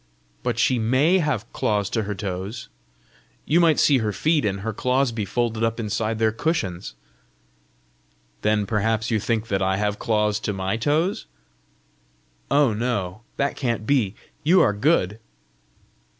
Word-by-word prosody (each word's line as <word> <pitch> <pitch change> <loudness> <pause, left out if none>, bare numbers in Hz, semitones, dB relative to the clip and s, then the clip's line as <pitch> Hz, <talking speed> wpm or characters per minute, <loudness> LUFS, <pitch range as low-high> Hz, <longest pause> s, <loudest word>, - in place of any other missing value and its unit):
"But 120 -2 -2
she 120 +1 +2
MAY 135 +11 +3
have 135 - -2
claws 105 -2 0
to 115 - 0
her 105 -1 -4
toes! 95 +3 -5 0.8
You 160 +4 +3
might 165 -3 +4
see 140 -3 +4
her 110 -2 -1
feet, 155 +5 +1
and 100 -1 -1
her 110 +2 -3
claws 125 +3 +1
be 110 -3 -3
folded 115 +1 -1
up 115 +1 0
inside 110 0 -2
their 110 0 +2
cushions!" 105 - -2 1.5
"Then 105 -1 +1
perhaps 110 +2 0
you 110 - +2
think 110 +1 -1
that 95 -1 0
I 95 0 +1
have 105 0 -1
claws 105 -2 +1
to 105 - -3
my 95 +1 -2
toes?" 155 - 0 1.2
"Oh, 140 -4 +3
no; 105 -4 -2 0.2
that 140 0 0
can't 115 -5 -2
be! 115 -8 +1 0.3
you 175 +5 +5
are 105 - +4
good!" 105 - +1
110 Hz, 150 wpm, -23 LUFS, 105-130 Hz, 1.5 s, you